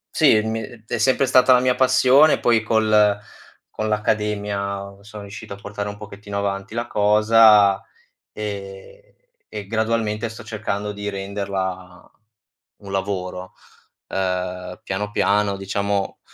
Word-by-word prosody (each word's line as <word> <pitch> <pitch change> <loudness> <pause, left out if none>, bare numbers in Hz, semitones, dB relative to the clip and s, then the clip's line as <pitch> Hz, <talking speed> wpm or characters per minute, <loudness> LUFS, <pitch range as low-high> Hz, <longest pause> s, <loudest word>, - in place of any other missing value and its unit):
sì, 140 -9 +5
mi 110 0 -2 0.2
è 120 - -3
sempre 130 +4 +3
stata 130 0 +5
la 125 - +5
mia 125 0 +2
passione, 130 +3 +4
poi 115 -2 +3
col 110 -2 +3 0.5
con 110 - -3
l'accademia 100 -2 -2
sono 105 0 -10
riuscito 100 0 -9
a - - -7
portare 100 +1 -6
un 100 - -8
pochettino 100 -1 -8
avanti 100 +1 -3
la 120 0 -2
cosa 105 -1 +5 0.5
e 100 - -8 0.4
e 105 -2 -7
gradualmente 110 0 -1
sto 110 +2 -10
cercando 105 -1 -4
di 105 0 -5
renderla 95 -2 -5 0.7
un 100 -1 -11
lavoro. 95 -2 -4 0.6
Eh 90 -1 -3
piano, 105 +2 -3
piano 100 -1 +1
diciamo, 100 0 -2
105 Hz, 125 wpm, -21 LUFS, 100-110 Hz, 0.7 s, sì